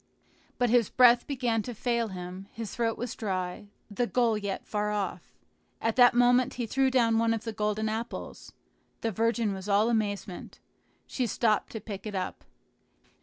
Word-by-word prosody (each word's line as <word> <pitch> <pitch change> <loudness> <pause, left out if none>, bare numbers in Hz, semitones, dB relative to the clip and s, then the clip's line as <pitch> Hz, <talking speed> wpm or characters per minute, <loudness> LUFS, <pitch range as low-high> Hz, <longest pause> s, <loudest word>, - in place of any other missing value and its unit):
But 245 -2 +2
his 240 -4 +4
breath 245 -1 +5
began 245 -5 0
to 240 +2 -7
fail 235 0 0
him, 185 0 -7
his 225 -2 -6
throat 230 -1 0
was 245 0 -4
dry, 185 -2 -3 0.2
the 235 +3 -1
goal 235 -3 +2
yet 200 -2 -4
far 210 0 -1
off. 210 -2 -4 0.4
At 225 0 0
that 245 -1 +7
moment 245 +1 +4
he 240 - -2
threw 265 +4 +2
down 230 -3 +3
one 230 0 +2
of 220 - -6
the 225 - -4
golden 210 +1 -1
apples. 225 +2 -5 0.5
The 225 - -1
virgin 225 0 +1
was 190 +1 -7
all 210 +4 +3
amazement. 205 -4 -3 0.5
She 250 -2 -2
stopped 215 0 +1
to 220 - -4
pick 205 0 -7
it 205 - -5
up. 185 - -4
225 Hz, 170 wpm, -28 LUFS, 205-240 Hz, 0.5 s, that